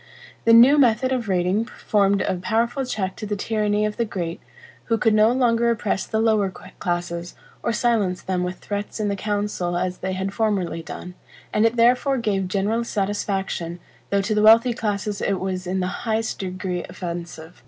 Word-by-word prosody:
The 230 - +6
new 255 +6 +8
method 255 0 +3
of 245 -5 -1
rating 185 +4 +1
formed 200 -4 +1
a - - 0
powerful 230 +8 0
check 190 -6 -2
to 215 - -5
the 205 - -1
tyranny 210 0 0
of 210 0 -3
the 235 - +2
great, 175 -6 -4 0.4
who 230 - +1
could 225 0 +2
no 215 +2 +5
longer 235 -2 +2
oppress 215 -4 -1
the 220 - -1
lower 215 -3 +2
classes, 175 -2 -5 0.3
or 235 - 0
silence 215 -6 0
them 185 -1 -1
with 180 +1 -3
threats 205 +2 -5
in 210 -1 0
the 200 - -1
council 205 -3 -2
as 180 0 -2
they 190 0 -3
had 190 +1 -3
formerly 195 -7 0
done, 180 +2 -8 0.4
and 215 +2 +4
it 230 - -2
therefore 250 +3 +3
gave 200 -5 0
general 205 +5 0
satisfaction, 195 -5 -2 0.3
though 200 0 +2
to 210 +2 0
the 210 - +2
wealthy 230 +3 +6
classes 210 -2 -2
it 195 -2 0
was 185 -1 -3
in 185 +1 -1
the - - 0 0.2
highest 225 -1 -1
degree 185 -1 -3
offensive. 170 -2 -7
205 Hz, 185 wpm, -23 LUFS, 185-225 Hz, 0.4 s, new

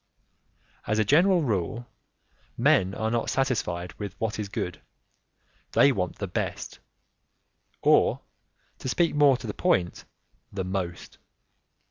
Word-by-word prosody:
As 105 - +1
a 110 - +2
general 175 - +4
rule, 115 - -2 0.7
men 95 +1 +3
are 110 0 -1
not 120 -1 -1
satisfied 110 -10 -1
with 100 -3 -6
what 110 -1 -2
is 105 -2 -4
good; 90 -2 -4 0.9
they 140 - +6
want 90 -8 -2
the - - -4
best, - - -4 1.0
or, - - +4 0.6
to 130 - -4
speak 170 +5 +1
more 145 -3 +5
to 125 - -10
the 105 - -4
point, 85 -1 0 0.5
the 95 -1 -3
most. 90 -2 -5
110 Hz, 125 wpm, -26 LUFS, 95-130 Hz, 1.0 s, they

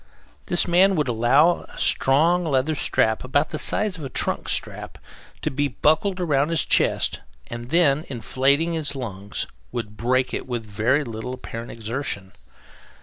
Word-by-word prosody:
This 175 - +1
man 185 +3 +4
would 150 -4 0
allow 125 +9 +3
a - - -14
strong 165 +7 +3
leather 145 -1 +1
strap, 110 -6 +1
about 145 +4 0
the 155 - -3
size 205 +1 +1
of - - -8
a 135 - -5
trunk - - -1
strap, - - -3 0.5
to - - -1
be 145 +2 0
buckled 160 +8 +1
round 150 -4 +1
his 165 -1 +1
chest; - - +1 0.3
and 120 +1 -7
then, 155 -2 +3
inflating 135 - +1
his 150 -3 -3
lungs, 100 -6 -5 0.3
would 105 -3 -5
break 130 +3 0
it - - -4
with 120 -3 -4
very 110 +8 +1
little 115 +1 -6
apparent 115 -2 -8
exertion. 115 -4 -4
135 Hz, 155 wpm, -23 LUFS, 120-160 Hz, 0.5 s, man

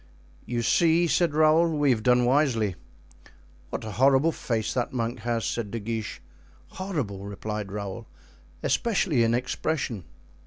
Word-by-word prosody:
"You 120 -1 -1
see," 170 +6 +3
said 165 0 +1
Raoul, 155 +1 +4
"we 145 -2 +3
have 115 -3 +1
done 125 +1 +4
wisely." 125 -7 +2 1.0
"What - - -5
a 110 - -5
horrible 135 +7 +4
face 115 -7 -2
that 125 -2 -1
monk 120 -1 -2
has," 115 0 -2
said 115 -4 -2
De 115 - -4
Guiche. 110 0 -5 0.5
"Horrible!" 140 - -4
replied 105 0 -5
Raoul, 105 +2 -6 0.6
"especially 195 - +1
in 115 0 +3
expression." 125 - -2
120 Hz, 140 wpm, -26 LUFS, 110-150 Hz, 1.0 s, Raoul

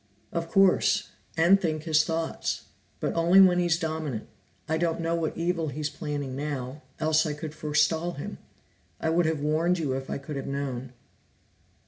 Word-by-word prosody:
"Of 165 0 -3
course, 195 +1 +3 0.3
and 180 +5 +5
think 155 -3 -1
his 155 -2 +3
thoughts. 165 0 -2 0.4
But - - -1
only 170 +3 +5
when 180 -2 +7
he's 175 -2 +2
dominant. 155 -8 -3 0.4
I 160 0 0
don't 170 -1 0
know 165 0 0
what 165 -2 -1
evil 170 -1 0
he's 150 +1 -3
planning 145 -3 -4
now, 140 -1 -4 0.2
else 155 0 +3
I 150 - -1
could 150 0 -6
forestall 155 +3 +1
him, 145 - -7 0.6
I 160 - 0
would 170 0 +3
have 160 -2 -1
warned 160 +4 +2
you 150 -6 -1
if 135 0 -4
I - - -2
could 140 +1 -6
have 135 - -5
known." 135 -2 -4
155 Hz, 170 wpm, -27 LUFS, 145-165 Hz, 0.6 s, when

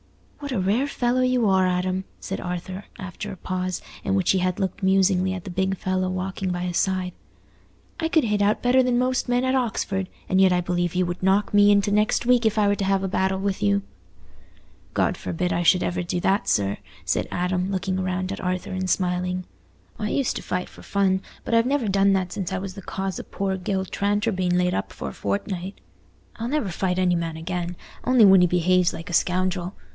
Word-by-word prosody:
"What 285 -1 -6
a 245 - 0
rare 210 +9 +1
fellow 250 -2 0
you 255 -3 +2
are, 190 -1 +4
Adam!" 185 +1 -1
said 195 - -5
Arthur, 180 +2 -5
after 190 +2 -6
a 190 - -8
pause, 185 0 -3 0.2
in 195 - 0
which 190 -3 +3
he 190 - +2
had 185 +1 -1
looked 190 0 -2
musingly 190 -1 +3
at 185 -2 -6
the 190 - -7
big 190 +1 0
fellow 185 0 -1
walking 185 +1 -3
by 175 0 -2
his 180 -1 -2
side. 185 -2 0 0.9
"I 325 - 0
could 320 -2 +3
hit 210 -2 +1
out 205 +1 +2
better 250 +2 +5
than 250 -1 +2
most 255 0 0
men 245 +1 +2
at 260 - +1
Oxford, 215 -6 -1 0.2
and 190 +1 +3
yet 190 -1 +6
I 180 - +3
believe 175 0 -1
you 180 0 +2
would 175 +1 -4
knock 195 +3 +2
me 205 0 +6
into 205 0 +3
next 210 +3 +2
week 245 -1 +4
if 220 0 +1
I 210 -1 +4
were 200 - +3
to - - -1
have 195 0 +1
a - - 0
battle 190 +1 0
with 195 0 -2
you." 100 -1 +2 1.1
"God - - +2
forbid 180 +1 -2
I 170 - 0
should 180 +1 +4
ever 175 0 -1
do 175 0 -2
that, 195 +3 +1
sir," 100 0 +1 0.3
said - - 0
Adam, 180 +1 -1
looking 190 0 -1
round 185 0 -2
at 200 - -5
Arthur 180 -1 -2
and 185 0 -2
smiling. 180 0 0 0.5
"I 210 -1 -1
used 275 +1 0
to - - -5
fight 180 0 -3
for - - -15
fun, 190 -1 +1 0.2
but - - -3
I've 230 +1 +4
never 275 -4 +1
done 195 0 +3
that 185 -2 -1
since 190 -3 -3
I 190 - -1
was 190 0 -5
the 195 - -9
cause 190 0 -4
o' - - -5
poor 195 -1 -2
Gil 190 +1 -2
Tranter 205 +4 0
being 180 -2 0
laid 180 0 +2
up 95 - -2
for - - -6
a - - -9
fortnight. 175 - -3 0.6
I'll 230 - -3
never 285 -8 0
fight 180 +1 -1
any 180 -1 +2
man 165 -1 -3
again, 175 +1 -4 0.3
only 250 -3 +5
when 190 -2 +7
he 180 - +5
behaves 180 +1 +3
like 165 +3 -8
a - - -6
scoundrel. 180 +1 0
190 Hz, 220 wpm, -24 LUFS, 180-205 Hz, 1.1 s, when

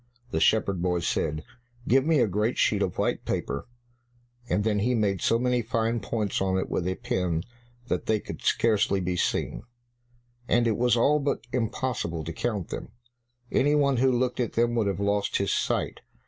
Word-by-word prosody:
The - - 0
shepherd 100 -5 +2
boy 90 -1 0
said, 75 -1 -1 0.4
"Give 130 +2 +4
me 160 -5 +4
a - - +3
great 105 +5 0
sheet - - +2
of - - -1
white - - 0
paper," 70 - -3 0.8
and 95 +4 +1
then 105 -1 +1
he 125 +5 +1
made 100 -4 0
so 115 - +3
many 125 0 +1
fine 115 +1 0
points 105 -4 -2
on 95 -1 +1
it 95 - -2
with 90 - -1
a 95 - -1
pen 90 -10 -1 0.4
that - - -2
they 110 -1 +2
could - - -8
scarcely 105 -3 +2
be 90 -1 -1
seen, - - -1 0.9
and 120 0 +3
it 115 -2 +2
was 120 +1 +2
all 150 +6 +4
but 140 -4 -2
impossible 115 -8 -2
to 85 - -5
count 105 -1 -2
them; - - -6 0.6
any 145 +2 +3
one 140 -3 +3
who 130 +2 +4
looked 125 0 0
at 120 - -1
them 120 +1 +2
would 115 -3 +1
have 100 -1 -1
lost 100 0 +1
his 100 - 0
sight. - - -1
110 Hz, 190 wpm, -27 LUFS, 95-120 Hz, 0.9 s, Give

